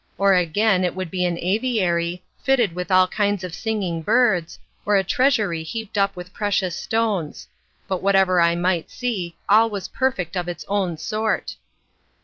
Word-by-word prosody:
Or 195 0 +4
again, 185 +2 +2
it 180 -1 -1
would 185 -3 -5
be 180 -1 0
an 175 -1 -1
aviary, 180 -4 0 0.2
fitted 245 -9 +2
with 180 0 -5
all 185 -1 +5
kinds 205 -1 -1
of 180 -2 -6
singing 195 -6 -2
birds, 210 -4 +2 0.3
or 205 - +2
a 195 - +3
treasury 210 -6 +1
heaped 220 +7 -6
up 195 -1 +1
with 180 +1 -9
precious 195 -4 -1
stones; 215 -9 -2 0.4
but 190 -2 -2
whatever 190 -2 +3
I 170 0 +3
might 175 -1 0
see, 195 -9 -3
all 220 +3 +5
was 200 -3 -5
perfect 235 -10 -1
of 175 -1 -2
its 175 - -6
own 195 -5 -1
sort. 215 +7 -2
190 Hz, 165 wpm, -22 LUFS, 175-215 Hz, 0.4 s, all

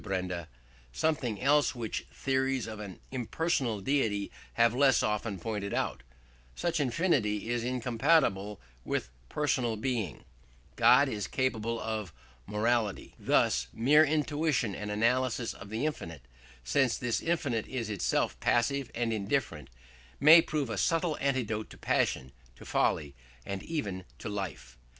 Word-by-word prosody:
Benda, 90 -4 -3 0.4
"something 125 - -1
else 145 0 +3
which 115 -3 -4
theories 130 -2 0
of 110 -1 -7
an 100 -3 -8
impersonal 125 - -1
deity 105 -5 0 0.2
have 115 -1 +4
less 135 -1 +4
often 105 -1 -1
pointed 100 +1 -3
out. - - -1 0.5
Since 170 -1 -1
infinity 120 - +1
is 120 -1 0
incompatible 120 -4 +1 0.2
with 60 - -2 0.2
personal 130 -6 0
being, 110 - -3 0.5
God - - +6
is 105 -4 -3
incapable 115 -3 -1
of 110 -5 -3 0.4
morality." 110 0 0
Thus - - +2
mere 145 +7 +5
intuition 150 -6 0
and 105 +2 -5
analysis 115 +2 +1
of 100 - -11
the 110 +7 -2
infinite, 85 - -4 0.4
since 125 - +2
this 125 -2 -1
infinite 140 -10 -1
is 125 -4 -3
itself 100 - 0
passive 125 +2 +1
and 115 -1 0
indifferent, 100 - -2 0.5
may 160 +3 +9
prove 150 -7 -2
a 105 - -2
subtle 165 - +1
antidote 120 -6 -1
to - - -13
passion, 65 0 0 0.2
to - - -13
folly, 70 -2 0 0.3
and 100 -1 -4
even 100 - -4
to 115 - -6
life. 65 -12 -6
115 Hz, 130 wpm, -30 LUFS, 105-135 Hz, 0.5 s, may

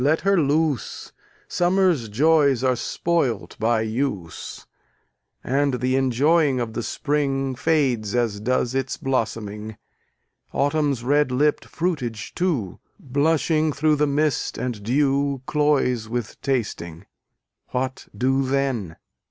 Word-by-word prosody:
let 150 +4 +2
her 195 0 +3
loose; 150 -2 -1 0.4
Summer's 175 - +2
joys 140 +1 +3
are 130 -1 +3
spoilt 130 - -1
by 110 0 +2
use, 110 - -4 0.8
And 140 +1 +1
the 125 +1 0
enjoying 135 +2 +3
of 115 -2 -3
the 120 - -2
Spring 135 0 -1
Fades 125 -7 +1
as 115 -4 0
does 125 +2 0
its 135 -1 -2
blossoming: 110 -4 -3 0.8
Autumn's 145 -3 +1
red 145 +1 +2
lipp'd 145 +4 +1
fruitage 135 -11 -3
too, 150 - -1 0.2
Blushing 155 +3 +1
through 150 +2 +2
the 150 +1 +2
mist 145 -1 0
and 120 -5 -3
dew, 140 +3 +1
Cloys 135 -7 +1
with 120 -2 -4
tasting: 100 -9 -3 0.6
What 130 +1 -3
do 135 +2 +2
then? 130 -10 -1
135 Hz, 115 wpm, -23 LUFS, 120-150 Hz, 0.8 s, her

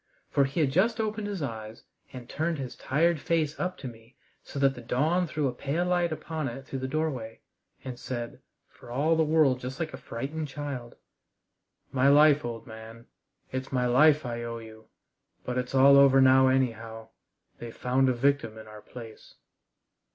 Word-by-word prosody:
For 140 - +3
he 145 +3 0
just 190 - +1
opened 215 -1 -2
his 200 -6 -4
eyes 110 -3 -7 0.3
and 125 -2 -9
turned 160 +4 -2
his 130 -3 -6
tired 165 +4 +1
face 155 -1 -1
up 185 0 -2
to 135 - -7
me 115 +1 -13 0.3
so - - -10
that 135 -1 +3
the 120 - -10
dawn 155 +10 +1
threw 150 -3 -1
a 125 - -2
pale 145 +7 -2
light 175 -1 +1
upon 155 -1 -4
it 130 +2 -7
through 135 - -5
the 130 - -3
doorway, 130 -7 -3 0.4
and 125 -2 -7
said, 120 -3 -6 0.3
for - - -16
all 145 +7 +1
the 160 - +2
world 155 -5 +3
just 130 +4 -7
like 160 -4 -3
a - - -6
frightened 140 +5 -5
child: 135 -4 -6 1.0
"My 135 -1 +2
life, 150 0 +6
old 115 -1 -6
man 110 0 -11 0.5
it's 130 0 -4
my 125 -2 +1
life 150 +4 +4
I 120 -1 -4
owe 115 0 -5
you. 110 -1 -12 0.6
But 125 0 -1
it's 125 +1 -4
all 135 +1 +7
over 135 -1 +6
now 130 0 +6
anyhow. 115 -4 -1 0.5
They've 120 -1 -9
found 130 +1 +2
a - - +2
victim 125 -3 0
in 110 0 -11
our 105 0 -11
place!" 115 0 -12
130 Hz, 180 wpm, -28 LUFS, 120-155 Hz, 1.0 s, all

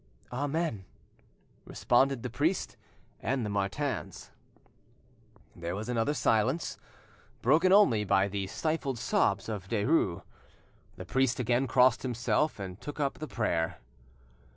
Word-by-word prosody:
"Amen," 145 - -2 0.8
responded 130 0 +1
the 125 - -3
priest 155 +9 -1 0.4
and 130 -3 -1
the 105 - -3
Martins. 100 +8 -3 1.2
There 85 +1 -4
was 110 +4 -5
another 120 +5 0
silence, 130 +7 +1 0.6
broken 160 +9 +4
only 160 - +5
by 95 -1 +2
the 100 -1 -3
stifled 155 +1 -2
sobs 100 -3 +1
of 105 -4 -5
Derues. 105 - +1 0.7
The 90 - -8
priest 130 +4 +1
again 125 +2 +1
crossed 125 0 +4
himself 120 +2 0
and 95 0 -7
took 145 +2 -7
up 140 -2 -1
the 155 - -5
prayer. 85 - -1
125 Hz, 120 wpm, -30 LUFS, 100-145 Hz, 1.2 s, only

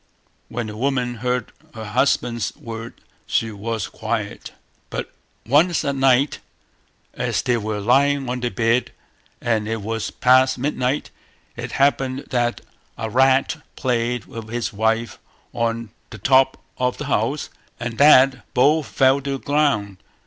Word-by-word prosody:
When 120 0 -3
the 105 -1 -7
woman 125 0 -1
heard 125 -2 -1 0.2
her 110 -1 -6
husband's 115 0 0
word 115 0 -8 0.3
she 110 - 0
was 110 0 -3
quiet. - - -4 0.4
But - - -5 0.3
once 155 +7 +3
at 140 -1 0
night, 135 +1 +3 0.7
as - - -1
they 125 - +2
were 110 -1 -3
lying 135 +5 +2
on 125 +1 -2
their 120 0 -1
bed, 115 +1 +1 0.5
and 110 -3 0
it 110 -2 -3
was 115 +1 -3
past 130 0 +4
midnight, 130 0 -1 0.4
it - - -6
happened 135 -1 +1
that 120 -2 0 0.4
a 110 -1 -4
rat 135 +5 +3 0.2
played 120 -3 -1
with 115 -1 -9
his 120 -1 -3
wife 110 +2 0 0.3
on 115 -2 -2 0.2
the - - -9
top 130 +5 +3 0.2
of 125 0 0
the 150 - -5
house 135 +2 -1 0.3
and 115 -1 -5
that 135 -2 +5
both 145 +4 +3
fell 135 +1 +3
to 140 0 -3
the - - -2
ground. 135 -10 0
125 Hz, 140 wpm, -22 LUFS, 115-135 Hz, 0.7 s, that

